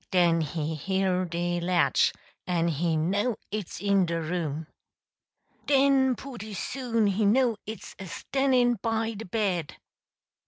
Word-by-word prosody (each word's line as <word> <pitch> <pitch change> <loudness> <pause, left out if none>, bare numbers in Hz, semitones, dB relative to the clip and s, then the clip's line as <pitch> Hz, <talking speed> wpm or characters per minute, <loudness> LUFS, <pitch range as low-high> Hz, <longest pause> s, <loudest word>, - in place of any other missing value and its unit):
Den 170 -3 +3
he 155 0 -2
hear 185 +3 0
de 175 0 -1
latch, 175 0 +3 0.4
en 170 -2 +1
he 165 +1 0
know 200 +9 +1 0.2
it's 210 -4 -4
in 200 -3 +2
de 165 0 -1
room! 160 -2 -3 1.0
Den 270 -2 +4
pooty 220 -5 -8
soon 235 -1 -1
he 200 +2 +1
know 235 +3 +3
it's 220 +1 -7
a 190 - -7
stannin' 250 +2 +1
by 225 0 0
de 220 +1 -7
bed! 185 -6 -1
195 Hz, 130 wpm, -27 LUFS, 170-230 Hz, 1.0 s, Den